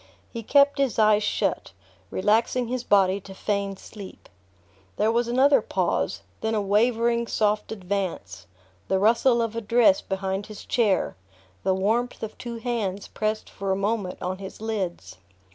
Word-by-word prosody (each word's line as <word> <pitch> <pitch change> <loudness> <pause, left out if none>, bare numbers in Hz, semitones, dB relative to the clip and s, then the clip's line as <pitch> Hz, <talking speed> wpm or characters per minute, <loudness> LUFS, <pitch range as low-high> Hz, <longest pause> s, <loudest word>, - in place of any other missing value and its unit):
He 230 - -4
kept 280 +5 +4
his 275 -4 +1
eyes 215 -1 +5
shut, - - -1 0.4
relaxing 230 +4 +1
his 250 -1 -2
body 195 -2 +3
to 190 0 -11
feign 200 -1 -2
sleep. 200 -2 -12 0.7
There 220 - +2
was 235 +1 +1
another 265 +2 +4
pause, 135 - -1 0.2
then 220 0 0
a - - +2
wavering 230 +3 +2
soft 210 -1 0
advance, 185 - -4 0.4
the 190 - +2
rustle 235 +4 +3
of 225 -1 -4
a 230 - -2
dress 225 -2 +4
behind 195 0 -3
his 215 -1 -10
chair, 215 -6 +1 0.5
the 190 - +1
warmth 225 +7 0
of 220 - -5
two 235 -1 -6
hands 220 -5 -3
pressed 215 0 -2
for 195 0 -4
a - - +2
moment 200 -1 -2
on 185 +1 -3
his 195 -1 -9
lids. 210 -6 -4
215 Hz, 155 wpm, -25 LUFS, 195-235 Hz, 0.7 s, eyes